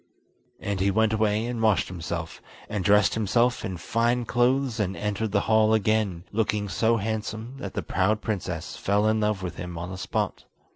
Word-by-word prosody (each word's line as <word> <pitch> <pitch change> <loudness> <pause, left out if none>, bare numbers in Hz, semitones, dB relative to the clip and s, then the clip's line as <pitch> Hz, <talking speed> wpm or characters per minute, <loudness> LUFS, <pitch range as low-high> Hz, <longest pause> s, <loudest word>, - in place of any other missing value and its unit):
And 100 -2 -3
he 95 +1 +2
went 110 +2 +2
away 110 0 +1
and 120 -1 -3
washed 110 -4 +3
himself, 85 -2 -5 0.3
and 105 -3 -3
dressed 105 +1 +4
himself 115 +3 +1
in 95 -2 -4
fine 115 +6 0
clothes 125 0 +1
and 95 -2 -1
entered 105 +1 -2
the 100 -1 +2
hall 110 0 +4
again, 105 -5 +1
looking 105 -1 0
so 115 +5 +2
handsome 110 +3 -4
that 100 -7 -6
the - - -2
proud 95 +4 +1
princess 90 -7 -4
fell 100 +1 +1
in 110 0 +2
love 105 -3 0
with 85 -2 -5
him 90 -1 -6
on 85 +2 -5
the 95 - -6
spot. - - -2
105 Hz, 185 wpm, -26 LUFS, 95-110 Hz, 0.3 s, dressed